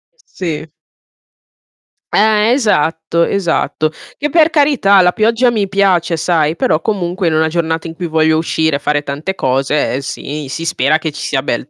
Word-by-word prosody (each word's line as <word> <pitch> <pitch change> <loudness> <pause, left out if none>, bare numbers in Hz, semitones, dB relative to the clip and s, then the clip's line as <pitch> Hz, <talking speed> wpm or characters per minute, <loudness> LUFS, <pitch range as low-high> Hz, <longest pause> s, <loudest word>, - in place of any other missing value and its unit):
Sì. 165 - -6 1.4
Eh, 215 +1 +3
esatto, 170 - 0
esatto. 170 -4 -1 0.3
Che 295 - -2
per 325 0 +4
carità 280 -11 +3
la 180 - +4
pioggia 230 +4 +2
mi 205 -4 -1
piace 185 -4 +1
sai, 160 -1 +1
però 155 -1 0
comunque 180 -2 -2
in 160 - +1
una 160 0 +2
giornata 165 0 -2
in 165 - -7
cui 175 +1 -5
voglio 160 0 +2
uscire 160 -2 0
e - - -12
fare 145 0 -1
tante 150 +8 -4
cose, 135 +2 0
ehm, 130 - -1
sì 140 +1 -6
si 165 +4 -5
spera 155 -1 +1
che 160 -1 -4
ci 150 - -8
sia 135 -3 -1
bel 130 +1 -3
165 Hz, 170 wpm, -15 LUFS, 155-200 Hz, 1.4 s, per